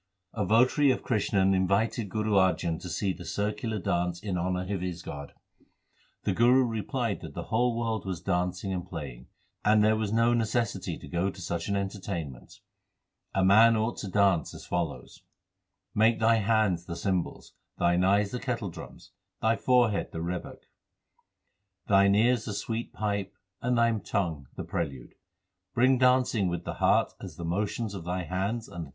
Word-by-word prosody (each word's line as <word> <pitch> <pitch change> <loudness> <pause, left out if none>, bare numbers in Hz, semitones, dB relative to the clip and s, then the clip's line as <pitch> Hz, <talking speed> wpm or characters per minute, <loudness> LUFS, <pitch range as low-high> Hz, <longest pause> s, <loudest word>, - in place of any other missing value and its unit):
A 105 - -1
votary 130 +6 +4
of 130 - +1
Krishan 100 -4 +2
invited 100 +3 +1
Guru 110 +2 -1
Arjan 90 -4 +2
to 90 - -7
see 95 +3 -1
the 90 - -10
circular 105 +3 -2
dance 90 -2 -1
in 100 -1 -3
honour 90 +2 -1
of 95 - -2
his 90 -2 -4
god. 70 0 -8 0.9
The - - 0
Guru 125 +3 +5
replied 115 0 -2
that 80 -4 -9
the - - -4
whole 120 +1 +2
world 115 -3 -1
was 95 -4 -3
dancing 90 +1 -1
and 90 -1 -3
playing, 70 -9 -8 0.4
and 105 0 +4
there 110 +1 +4
was 110 -2 -2
no 115 +2 +3
necessity 115 -1 -1
to - - -11
go 85 +6 0
to 95 - -10
such 85 -1 -3
an 100 - +1
enter 100 +1 -3
tainment. 85 -10 -6 0.7
A 95 -1 +3
man 110 +4 +6
ought 110 +2 -1
to 105 - -5
dance 95 -5 +2
as - - -10
follows: 75 -8 -4 0.7
Make 110 +2 +3
thy 115 0 +4
hands 105 -5 +1
the 85 - -5
cymbals, 90 +1 -2 0.2
thine 85 +1 +2
eyes 100 +2 +3
the 125 - -3
kettledrums, 115 -9 -6 0.3
thy 110 +1 +2
forehead 120 -4 +2
the 80 - -4
rebeck, 90 +1 -5 1.2
Thine 100 0 +5
ears 120 +2 +3
the 105 - -4
sweet 115 +3 -3
pipe, 100 -2 -3 0.3
and 125 0 +1
thy 115 0 +4
tongue 80 -10 -2
the - - -5
prelude. 70 -7 -4
100 Hz, 145 wpm, -28 LUFS, 90-110 Hz, 1.2 s, man